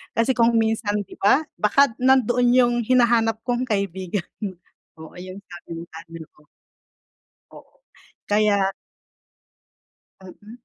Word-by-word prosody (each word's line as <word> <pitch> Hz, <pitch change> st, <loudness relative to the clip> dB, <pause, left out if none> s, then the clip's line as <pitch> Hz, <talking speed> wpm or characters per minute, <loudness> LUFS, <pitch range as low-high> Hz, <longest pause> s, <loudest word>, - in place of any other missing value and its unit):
Kasi 230 Hz, +3 st, +2 dB
kung 230 Hz, 0 st, +3 dB
minsan 220 Hz, -2 st, 0 dB
'di -, -, -14 dB
ba 260 Hz, +10 st, +3 dB, 0.2 s
baka 275 Hz, +6 st, +3 dB
nandoon 245 Hz, -1 st, +3 dB
'yong 240 Hz, -1 st, +4 dB
hinahanap 235 Hz, -3 st, +2 dB
kong 245 Hz, +1 st, 0 dB
kaibigan, 190 Hz, -3 st, -3 dB, 0.7 s
oo, 160 Hz, -, -11 dB
yung 185 Hz, +2 st, -9 dB
sabi 175 Hz, -1 st, -13 dB
mo -, -, -7 dB
sabi 165 Hz, +1 st, -11 dB, 0.2 s
ko. 150 Hz, 0 st, -26 dB, 1.1 s
Oo -, -, -17 dB, 0.5 s
kaya 205 Hz, -2 st, +2 dB, 1.5 s
Mm. 205 Hz, +4 st, -13 dB
220 Hz, 115 wpm, -22 LUFS, 195-240 Hz, 1.5 s, yong